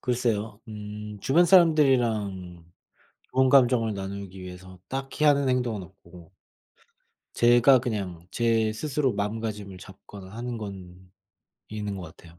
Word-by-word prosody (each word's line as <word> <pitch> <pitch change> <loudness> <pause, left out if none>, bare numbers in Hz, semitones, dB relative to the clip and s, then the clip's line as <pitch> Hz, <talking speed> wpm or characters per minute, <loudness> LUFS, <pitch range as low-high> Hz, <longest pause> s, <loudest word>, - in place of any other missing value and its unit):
글쎄요. 115 -4 -1
음 105 0 -8
주변 165 +6 +4
사람들이랑 120 - +2 0.7
좋은 130 0 +3
감정을 125 -5 +4
나누기 95 -1 -7
위해서 90 0 -11
딱히 135 +2 -5
하는 140 -2 +4
행동은 120 -6 -1
없고 90 -2 -17 1.0
제가 120 +2 +5
그냥 95 -8 -4
제 115 -2 +1
스스로 135 +2 -1
마음가짐을 105 -2 -4
잡거나 95 +1 -13
하는 120 -1 -5
건 95 -4 -8 0.7
있는 105 -2 -5
것 95 - -7
같아요. 85 0 -17
105 Hz, 270 characters per minute, -26 LUFS, 95-125 Hz, 1.0 s, 제가